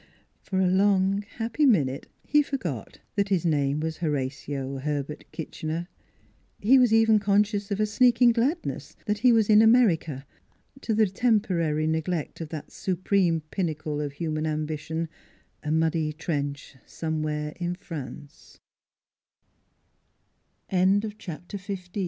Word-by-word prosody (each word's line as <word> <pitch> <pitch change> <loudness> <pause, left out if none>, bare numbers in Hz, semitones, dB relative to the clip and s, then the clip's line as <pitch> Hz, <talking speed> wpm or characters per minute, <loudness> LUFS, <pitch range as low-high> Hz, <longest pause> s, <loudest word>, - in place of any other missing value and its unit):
For 190 - -2
a 190 - +3
long, 195 0 +3 0.2
happy 230 +6 -1
minute 150 - +2 0.2
he 295 - +4
forgot 180 - -5
that 200 -1 0
his 185 -4 +1
name 145 -3 +1
was 160 0 -3
Horatio 135 -2 -3
Herbert 145 +1 -3
Kitchener. 160 +1 -5 0.7
He 260 +6 +5
was 250 -3 +4
even 225 -1 +5
conscious 205 0 +1
of 200 0 -2
a 215 - +3
sneaking 240 +2 +4
gladness 265 +9 -2
that 210 -1 -1
he 250 +2 +5
was 225 -3 +4
in 215 0 +7
America, 180 - +3 0.6
to 220 - -1
the 220 0 +5
temporary 185 -8 +1
neglect 160 +1 -2
of 160 - -5
that 155 -2 -7
su 185 - -2
preme 175 -3 +1
pinnacle 155 -5 -2
of 145 -1 -4
human 155 0 -2
ambition: 155 +1 -3 0.5
a 150 - -5
muddy 160 -1 +1
trenc 145 -3 -4
170 Hz, 115 wpm, -26 LUFS, 155-210 Hz, 0.7 s, in